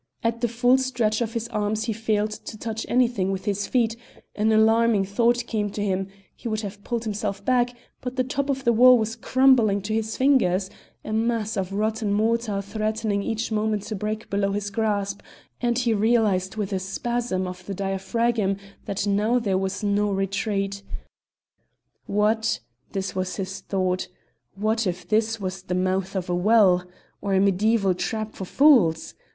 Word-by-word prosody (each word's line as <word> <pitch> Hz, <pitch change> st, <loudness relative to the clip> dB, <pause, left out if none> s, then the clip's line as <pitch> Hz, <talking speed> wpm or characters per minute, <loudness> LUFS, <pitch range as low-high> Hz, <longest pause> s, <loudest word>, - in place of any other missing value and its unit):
At 230 Hz, 0 st, 0 dB
the 240 Hz, -, +2 dB
full 245 Hz, +3 st, +3 dB
stretch 240 Hz, -4 st, 0 dB
of 230 Hz, -1 st, -2 dB
his 230 Hz, -1 st, -3 dB
arms 215 Hz, -1 st, -1 dB
he 225 Hz, 0 st, -1 dB
failed 215 Hz, -1 st, 0 dB
to 215 Hz, -, -8 dB
touch 225 Hz, 0 st, -4 dB
anything 235 Hz, -6 st, +2 dB
with 190 Hz, 0 st, -4 dB
his 205 Hz, -1 st, -1 dB
feet; 230 Hz, -3 st, +1 dB, 0.4 s
an 215 Hz, +1 st, +2 dB
alarming 220 Hz, -1 st, +4 dB
thought 235 Hz, +4 st, +1 dB
came 210 Hz, -3 st, -1 dB
to 205 Hz, -, -2 dB
him; 190 Hz, -1 st, -1 dB, 0.3 s
he -, -, -7 dB
would 215 Hz, -1 st, -1 dB
have 200 Hz, -1 st, -7 dB
pulled 235 Hz, -1 st, -2 dB
himself 205 Hz, -2 st, -3 dB
back, 245 Hz, -1 st, +2 dB, 0.3 s
but 250 Hz, 0 st, -5 dB
the 255 Hz, -, +1 dB
top 275 Hz, +2 st, -2 dB
of 270 Hz, -1 st, -1 dB
the 235 Hz, -2 st, +3 dB
wall 250 Hz, +2 st, +7 dB
was 225 Hz, 0 st, -2 dB
crumbling 240 Hz, -4 st, +4 dB
to 215 Hz, +2 st, -3 dB
his 220 Hz, 0 st, -2 dB
fingers, 200 Hz, -9 st, +2 dB, 0.3 s
a 215 Hz, -, -4 dB
mass 225 Hz, 0 st, 0 dB
of 190 Hz, -1 st, -2 dB
rotten 215 Hz, +1 st, -1 dB
mortar 215 Hz, -1 st, 0 dB
threatening 215 Hz, 0 st, -1 dB
each 225 Hz, +2 st, -2 dB
moment 215 Hz, -1 st, 0 dB
to 215 Hz, +1 st, -5 dB
break 215 Hz, +2 st, -4 dB
below 200 Hz, 0 st, 0 dB
his 205 Hz, 0 st, -3 dB
grasp, 200 Hz, -2 st, -1 dB, 0.4 s
and 240 Hz, -1 st, +1 dB
he 245 Hz, -2 st, +2 dB
realised 210 Hz, -3 st, +2 dB
with 210 Hz, -2 st, -3 dB
a 190 Hz, -, 0 dB
spasm 195 Hz, +1 st, -2 dB
of 180 Hz, 0 st, -7 dB
the 200 Hz, -, -4 dB
diaphragm 195 Hz, +2 st, 0 dB, 0.3 s
that 200 Hz, +1 st, -2 dB
now 210 Hz, +4 st, +2 dB
there 205 Hz, -6 st, 0 dB
was 190 Hz, +2 st, -2 dB
no 205 Hz, 0 st, +1 dB
retreat. 195 Hz, 0 st, -1 dB, 1.3 s
What 220 Hz, +2 st, +1 dB, 0.3 s
this 190 Hz, -1 st, -3 dB
was 185 Hz, -1 st, -2 dB
his 195 Hz, 0 st, -4 dB
thought 185 Hz, -1 st, -1 dB, 0.5 s
what 215 Hz, +2 st, 0 dB
if 180 Hz, 0 st, -4 dB
this 225 Hz, +1 st, +1 dB
was 190 Hz, -1 st, -4 dB
the 180 Hz, -1 st, -3 dB
mouth 185 Hz, +1 st, -1 dB
of 185 Hz, -1 st, -2 dB
a 180 Hz, -, -1 dB
well? 185 Hz, -2 st, +4 dB, 0.4 s
Or 195 Hz, -1 st, 0 dB
a -, -, +4 dB
mediaeval 200 Hz, +1 st, +3 dB
trap 215 Hz, +4 st, -3 dB
for 190 Hz, -, -6 dB
fools? 215 Hz, -, +4 dB
215 Hz, 175 wpm, -24 LUFS, 195-230 Hz, 1.3 s, wall